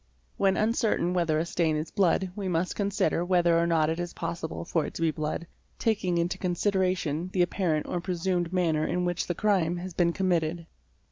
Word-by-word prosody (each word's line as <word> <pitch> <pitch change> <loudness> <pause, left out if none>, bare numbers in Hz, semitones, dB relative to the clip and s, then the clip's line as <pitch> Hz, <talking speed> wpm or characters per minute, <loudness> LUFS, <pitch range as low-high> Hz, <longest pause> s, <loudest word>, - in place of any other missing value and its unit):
When 195 -1 +2
uncertain 215 -5 +1
whether 170 -4 +1
a 160 - 0
stain 165 -2 0
is 155 +1 -3
blood 190 -2 +2
we 200 -2 -3
must 175 0 0
consider 200 -4 0
whether 175 -2 +3
or 170 - +2
not 160 -2 +3
it 160 +2 -1
is 175 0 -4
possible 165 0 -4
for 165 -2 0
it - - -9
to - - -5
be 160 - +3
blood, 155 +2 -3 0.3
taking 195 -6 0
into 170 +1 -1
consideration 180 -3 0
the 180 - +4
apparent 175 -4 0
or 175 - -3
presumed 175 -1 -1
manner 165 -4 +1
in 180 0 0
which 175 0 -1
the 175 - -1
crime 180 -5 +1
has 180 +1 -6
been 170 0 +2
committed. 170 -2 0
175 Hz, 195 wpm, -28 LUFS, 165-185 Hz, 0.3 s, the